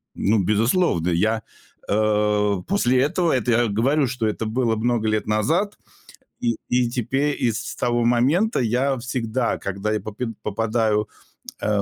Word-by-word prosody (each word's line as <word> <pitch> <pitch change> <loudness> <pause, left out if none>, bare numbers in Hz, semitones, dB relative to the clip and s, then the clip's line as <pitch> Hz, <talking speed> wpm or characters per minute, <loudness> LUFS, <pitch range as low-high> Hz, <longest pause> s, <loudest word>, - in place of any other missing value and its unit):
Ну, 110 +3 +2
безусловно! 105 - +1
Я, 110 +6 +1 0.5
э, 105 -1 +2
после 130 -11 +2
этого 165 +4 +1
это 125 -2 0
я 120 +1 +3
говорю, 135 +8 +2
что 125 -2 -2
это 110 +1 -2
было 115 0 0
много 110 -1 0
лет 110 0 0
назад. 160 - 0 0.6
И 115 -2 0
и 125 -1 +1
тепе 135 +4 0
и 120 -4 0
с 110 - -5
того 120 -1 0
момента 135 - +2
я 130 +3 +1
всегда, 120 -1 -2
когда 100 +2 -3
я 110 - 0
попид 110 +3 -5
попадаю, 110 0 0 0.5
э, - - -2
115 Hz, 145 wpm, -22 LUFS, 110-125 Hz, 0.6 s, я